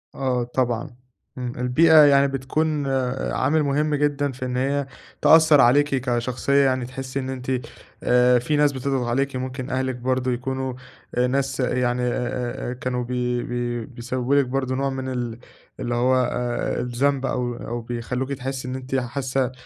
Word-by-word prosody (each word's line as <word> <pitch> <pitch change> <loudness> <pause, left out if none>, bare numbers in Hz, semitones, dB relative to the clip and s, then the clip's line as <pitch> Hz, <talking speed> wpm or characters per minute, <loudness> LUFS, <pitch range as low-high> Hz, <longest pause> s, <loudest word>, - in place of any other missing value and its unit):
آه 130 -3 0
طبعًا. 120 -1 -1 0.5
إمم. 125 -1 -4
البيئة 155 +7 +4
يعني 140 -1 +5
بتكون 140 +2 -1 0.4
عامل 150 +4 +2
مهم 150 +2 +1
جدًا 145 -1 0
في 130 0 -6
إن 125 0 -2
هي 140 +2 0 0.4
تأثّر 160 -3 +7
عليكِ 145 +5 +5
كشخصية 130 +2 +1
يعني. 130 -2 +1
تحسّي 130 +1 -5
إن 130 -1 -4
أنتِ 130 0 -4 0.5
آآ 125 0 +4
في 150 +5 -1
ناس 145 -1 +4
بتضغط 130 -2 -2
عليكِ. 135 +3 0
ممكن 130 +1 -4
أهلِك 130 -1 -1
برضه 130 +1 -1
يكونوا 130 +1 -3 0.4
آآ 125 +1 +2
ناس 135 0 -1
يعني 125 -1 0
أ 125 - +1 0.6
أ - - -2
أ - - -3
كانوا 125 0 -3
بي 125 0 -1
بي 120 -1 -3
بيسبّبوا 125 +2 -2
لِك 140 -1 +4
برضه 130 0 -2
نوع 135 +1 0
من 130 -1 -4
ال 120 -2 -4 0.4
اللي 120 0 -2
هو 125 +2 +3 0.2
آآ 120 0 -2
الذنب 135 +3 0
أو 125 -2 -1
أو 120 0 -5
بيخلّوكي 125 +3 -3
تحسّي 130 0 -5
إن 125 - -4
أنتِ 130 0 -4
حاسّة 130 0 -1
130 Hz, 165 wpm, -23 LUFS, 125-135 Hz, 0.6 s, تأثّر